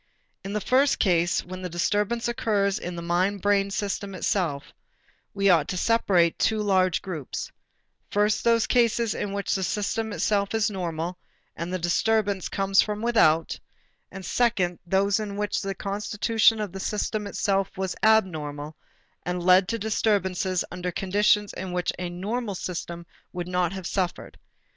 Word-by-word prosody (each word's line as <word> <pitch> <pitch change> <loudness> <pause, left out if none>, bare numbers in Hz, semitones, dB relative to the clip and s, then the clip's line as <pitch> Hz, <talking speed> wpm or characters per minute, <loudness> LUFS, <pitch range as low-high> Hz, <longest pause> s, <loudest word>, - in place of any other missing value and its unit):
In 195 +1 -5
the 210 - 0
first 265 +7 +3
case 175 -3 +2
when 185 +1 -8
the 180 - -4
disturbance 205 +7 0
occurs 210 -5 0
in 175 0 -5
the 170 - -6
mind 185 +4 0
brain 200 -1 +2
system 200 -1 -3
itself, 170 -7 -1 0.6
we 200 0 +2
ought 165 -6 +4
to 185 - -3
separate 185 -6 +2
two 220 - +2
large 185 -3 +2
groups, 160 -8 -5 0.6
first 210 +1 +1
those 230 -1 +3
cases 235 -2 +2
in 205 - -3
which 200 0 -2
the 190 - -1
system 210 +4 -1
itself 205 0 0
is 220 0 +1
normal 175 -2 -4 0.4
and 170 +1 -5
the 185 - -1
disturbance 200 +2 +1
comes 195 0 +3
from 210 0 -3
without, 165 -9 +3 0.5
and 190 -1 -8
second 195 -8 +1
those 195 +2 +2
in 205 -2 -5
which 210 -1 -1
the 195 -1 -3
constitution 210 +3 +1
of 210 -3 -3
the 195 - -7
system 210 +1 -2
itself 195 -1 0
was 190 -1 -2
abnormal 155 -9 +1 0.5
and 180 0 -3
led 185 +1 +5
to 230 - -1
disturbances 195 -4 0
under 180 0 -4
conditions 205 +3 +2
in 185 -1 -6
which 180 0 0
a 180 -1 -3
normal 205 +4 -3
system 170 -1 -5 0.3
would 175 -1 -4
not 180 -1 0
have 190 -2 -6
suffered. 180 -1 -3
195 Hz, 160 wpm, -25 LUFS, 180-210 Hz, 0.6 s, led